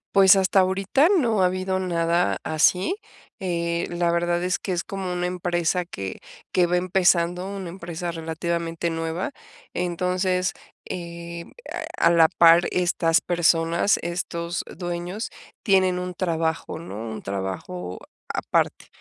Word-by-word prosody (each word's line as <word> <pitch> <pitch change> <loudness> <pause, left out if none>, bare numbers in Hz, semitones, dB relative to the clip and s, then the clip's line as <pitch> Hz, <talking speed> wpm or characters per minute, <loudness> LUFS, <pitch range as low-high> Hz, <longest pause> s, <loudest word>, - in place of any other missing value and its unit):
Pues, 195 0 +8
hasta 195 0 +3
ahorita, 195 - +3
no 225 -8 +2
ha - - +5
habido 185 +1 0
nada 170 -1 +1
así, 180 - +2 0.4
eh, 170 -3 -1
la 175 0 +1
verdad 175 +1 +1
es 180 -1 0
que 185 - -3
es 175 - -1
como 190 -2 -4
una 180 0 -1
empresa 175 0 0
que 95 - -6 0.3
que 180 -1 +3
va 175 - +1
empezando, 180 0 +2
una 195 -3 -5
empresa 170 -1 -5
relativamente 165 +1 -2
nueva, 165 - -3 0.4
entonces, 180 +1 0 0.3
eh, 170 -1 -7 0.5
a - - +4
a - - +7
la 165 -1 +6
par 170 0 +6
estas 170 -2 +2
personas, 170 +2 +2
estos 170 0 -3
dueños 175 +4 -4 0.3
tienen 185 -3 +3
un 180 0 -4
trabajo, 165 -3 -1
¿no?, 160 -10 -8
un 110 - -6
trabajo 95 -2 -5 0.3
aparte. - - 0
175 Hz, 135 wpm, -24 LUFS, 170-185 Hz, 0.5 s, Pues